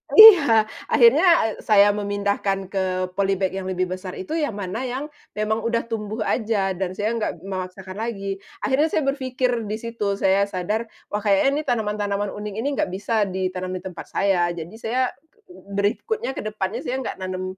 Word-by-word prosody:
Iya 325 - +10 0.2
akhirnya, 465 -4 +5 0.3
eee, - - -6
saya 205 -1 +5
memindahkan 200 -1 -1
ke 185 -1 -1
polybag 195 0 0
yang 190 0 -5
lebih 185 -1 -1
besar 185 0 -5
itu 190 - -7
yang 290 -9 -1
mana 200 +1 -4
yang, 270 +5 -4 0.2
memang 215 +1 0
udah 230 +1 0
tumbuh 215 -1 -4
aja 210 -4 0
dan 185 0 -3
saya 210 +3 -1
nggak 210 - -3
memaksakan 185 0 -6
lagi. 195 -4 -3 0.2
Akhirnya 280 +4 +3
saya 315 -2 0
berpikir 255 -4 -1
disitu 215 -1 -2
saya 195 0 +2
sadar 205 +4 -2 0.2
wah 210 - 0
kayaknya 210 +8 +2
nih 310 - -5
tanaman-tanaman 205 -3 -1
unik 210 0 -6
ini 225 +6 -2
nggak - - +2
bisa 210 +1 0
ditanam 185 -1 -3
di 185 - -6
tempat 185 -2 -8
saya 190 -3 +2
jadi 170 +2 -7
saya 235 +3 -1 0.5
berikutnya 245 - -2
ke - - -4
depannya 205 -3 -3
saya 250 - -2
nggak - - -5
menanam, 185 0 -4
205 Hz, 165 wpm, -23 LUFS, 190-230 Hz, 0.5 s, Iya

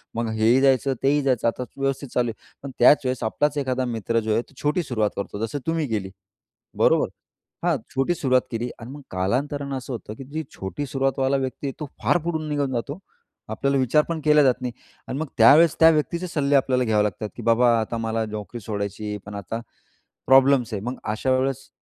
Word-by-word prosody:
मग 115 0 -1
हेही 110 +4 +3
जायचं, 135 0 +3
तेही 145 +2 +3
जायचं 130 -4 +1
आता 115 +2 -1
व्यवस्थित 135 0 -2
चालू 120 -1 +1
आहे. 110 - -9 0.2
पण 140 - -6
त्याच 135 +5 +7
वेळेस 130 -2 -1
आपलाच 145 +6 0
एखादा 130 -2 -1
मित्र 115 -1 -1
जो 110 -1 -1
आहे 115 - +2
तो 130 - -20
छोटी 150 +4 +1
सुरुवात 110 -7 0
करतो, 100 0 -5
जसं 145 +6 -5
तुम्ही 160 -3 0
केली 100 -4 -2 0.7
बरोबर. - - +4 0.6
हां, 170 -3 +2 0.2
छोटी 135 +6 +2
सुरुवात 130 -5 +2
केली 120 +1 -2
आणि 120 +2 -9
मग 145 +1 -9
कालांतरानं 135 +9 -1
असं 130 0 -6
होतं, 110 -2 -7
की 135 - -9
जी 155 +4 -5
छोटी 95 +9 -5
सुरुवातवाला 135 0 0
व्यक्ती 130 +1 -3
आहे, 135 - -3
तो 150 - -4 0.2
फार - - +4
पुढून 160 -2 -2
निघून 145 -2 -1
जातो. 140 +8 -3 0.5
आपल्याला 140 0 0
विचार 135 +4 +3
पण 165 -1 -2
केला 150 -1 +6
जात 130 -1 +2
नाही. 125 - -3 0.4
आणि 130 - -4
मग 160 - -2
त्यावेळेस 145 +8 +7
त्या 160 - +8
व्यक्तीचे 165 +3 0
सल्ले 145 -4 +1
आपल्याला 130 -2 +2
घ्यावे 110 -3 +2
लागतात, 105 +1 -3
की - - -8
बाबा 115 +1 +4
आता 110 +1 -3
मला 115 0 -1
नोकरी 110 +3 -6
सोडायची 100 0 -4
आहे. 105 - -3
पण 105 0 -8
आता 100 +3 -5 0.7
प्रॉब्लेम्स 130 -3 +5
आहे, 100 - -3
मग 125 +3 -4 0.2
अशा 130 +4 -1
वेळेस 135 0 -2
130 Hz, 205 wpm, -23 LUFS, 115-140 Hz, 0.7 s, त्या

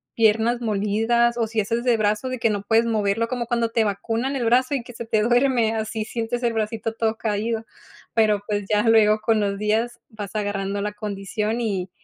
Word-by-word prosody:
piernas 225 +2 +3
molidas 225 +3 +1
o 230 - +1
si 220 0 0
haces 230 +3 -2
de 245 -2 +3
brazo 210 +3 0
de 255 -1 -4
que 230 - +2
no 205 -2 -2
puedes 225 +2 +3
moverlo, 220 0 0
como 245 0 -3
cuando 235 -1 0
te 225 0 +2
vacunan 225 +6 -2
el 260 - -1
brazo 255 +4 +3
y 260 - -3
que 245 - -12
se 235 0 -7
te 220 -2 +1
duerme, 240 -1 +2
así 220 0 -3
sientes 235 +1 -3
el 235 -1 +1
bracito 225 0 -2
todo 225 -1 -1
caído. 220 +1 -2 0.5
Pero 215 -3 +3
pues, 205 -1 -1
ya 210 -1 +3
luego, 215 -1 +5
con 220 0 +2
los 200 -1 -1
días, 225 +3 0
vas 210 -2 -8
agarrando 200 -1 -2
la 210 +1 -3
condición 210 +2 -3
y 195 -5 -2
225 Hz, 205 wpm, -23 LUFS, 210-235 Hz, 0.5 s, luego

